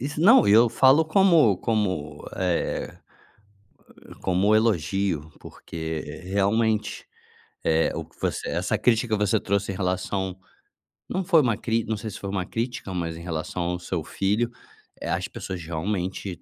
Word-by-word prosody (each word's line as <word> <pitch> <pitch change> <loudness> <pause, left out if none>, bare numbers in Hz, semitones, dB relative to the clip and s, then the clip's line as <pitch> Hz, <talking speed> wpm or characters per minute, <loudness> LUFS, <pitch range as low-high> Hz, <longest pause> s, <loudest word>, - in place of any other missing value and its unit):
Isso, 145 +4 -4
não, 180 - +7
eu 115 +4 +6
falo 135 +7 +5
como 160 - +4
como, 95 -11 -2
eh, 90 -2 -2 1.2
como 95 +3 +2
elogio, 95 -6 +1
porque 80 -1 -6 0.2
realmente, 105 +3 0 0.6
eh, 80 0 +2
o - - -4
que - - -25
você - - -2
essa - - -1
crítica 115 -1 +2
que - - 0
você - - +2
trouxe 100 0 -1
em - - -7
relação 95 0 -2 0.7
não 190 - -1
foi 170 -3 +5
uma 115 -6 +1
cri 115 0 0
não 110 0 -2
sei 110 +1 -5
se 95 - -8
foi 100 - -5
uma 95 -2 -2
crítica, 115 -2 -4
mas 85 -2 -3
em - - -9
relação 85 +1 -3
ao 90 +1 -2
seu 85 -2 -3
filho, 105 +8 0 0.5
eh, - - -4
as - - -1
pessoas 95 -2 -6
realmente, 90 +2 -3
100 Hz, 155 wpm, -25 LUFS, 90-115 Hz, 1.2 s, não